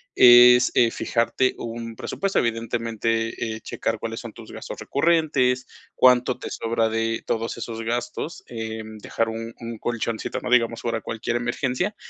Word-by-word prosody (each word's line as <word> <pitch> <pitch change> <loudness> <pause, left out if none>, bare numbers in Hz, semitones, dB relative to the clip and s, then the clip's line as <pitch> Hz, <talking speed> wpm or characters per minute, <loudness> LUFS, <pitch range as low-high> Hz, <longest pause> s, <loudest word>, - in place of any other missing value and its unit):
es, 125 0 +8
eh, 115 -2 +4
fijarte 125 +2 0
un 115 -1 -6
presupuesto, 195 - -1
evidentemente, 115 -1 -1
eh, 110 - -10
checar 115 -1 -3
cuáles 115 0 -4
son 115 -3 -9
tus 115 -2 -12
gastos - - -8
recurrentes, 140 -5 +1 0.3
cuánto 125 0 +4
te - - -6
sobra 115 0 0
de 115 0 -1
todos 115 +1 -2
esos 115 0 -5
gastos, 120 +7 -4
eh, 110 -1 -5 0.2
dejar 115 - -1
un 115 +1 -6
un 115 -1 -6
colchoncito, 115 -1 -3
no - - -4
digamos 115 -2 +2
ahora 115 -1 -1
cualquier 115 +2 -3
emergencia, 130 - -1
115 Hz, 150 wpm, -24 LUFS, 115-125 Hz, 0.3 s, es